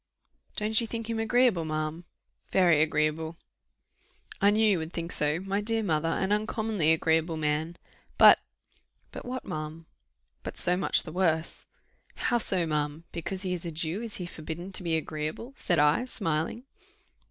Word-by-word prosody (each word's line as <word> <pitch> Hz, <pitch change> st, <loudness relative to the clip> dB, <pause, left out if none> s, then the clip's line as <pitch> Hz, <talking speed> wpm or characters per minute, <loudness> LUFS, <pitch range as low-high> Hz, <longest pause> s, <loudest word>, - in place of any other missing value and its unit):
"Don't 215 Hz, +2 st, +2 dB
you 230 Hz, -, -3 dB
think 230 Hz, 0 st, -4 dB
him 225 Hz, -, -2 dB
agreeable, 225 Hz, -5 st, +3 dB
ma'am?" 155 Hz, +2 st, -3 dB, 0.5 s
"Very 175 Hz, -5 st, +4 dB
agreeable." 155 Hz, +1 st, 0 dB, 1.0 s
"I 200 Hz, -, +6 dB
knew 215 Hz, +2 st, +3 dB
you 195 Hz, -5 st, +3 dB
would 160 Hz, +1 st, -6 dB
think 170 Hz, 0 st, -4 dB
so, 150 Hz, +2 st, +1 dB
my 195 Hz, +1 st, -1 dB
dear 225 Hz, +1 st, 0 dB
mother; 165 Hz, -4 st, 0 dB
an 190 Hz, +4 st, -1 dB
uncommonly 210 Hz, -5 st, +1 dB
agreeable 160 Hz, 0 st, +1 dB
man." 155 Hz, +2 st, -1 dB, 0.4 s
"But -, -, +8 dB, 0.3 s
" -, -, -39 dB
"But -, -, -8 dB
what, 255 Hz, 0 st, -5 dB
ma'am?" 155 Hz, +1 st, -6 dB, 0.6 s
"But -, -, -7 dB
so 180 Hz, 0 st, +3 dB
much 185 Hz, -, +2 dB
the 160 Hz, -, -8 dB
worse." 165 Hz, -2 st, +1 dB, 0.5 s
"How 240 Hz, -, +1 dB
so, 185 Hz, -5 st, +2 dB
ma'am? 150 Hz, 0 st, -2 dB
Because 185 Hz, +3 st, -4 dB
he 185 Hz, -1 st, -1 dB
is 175 Hz, -, -4 dB
a 170 Hz, -, -3 dB
Jew, 165 Hz, +5 st, -2 dB
is 230 Hz, -3 st, -2 dB
he 180 Hz, -, -4 dB
forbidden 170 Hz, +2 st, -7 dB
to 185 Hz, -, -2 dB
be 165 Hz, -2 st, 0 dB
agreeable?" 155 Hz, -, -5 dB
said 175 Hz, -, 0 dB
I, 150 Hz, +10 st, +3 dB
smiling. 190 Hz, -1 st, -2 dB
170 Hz, 165 wpm, -28 LUFS, 155-210 Hz, 1.0 s, But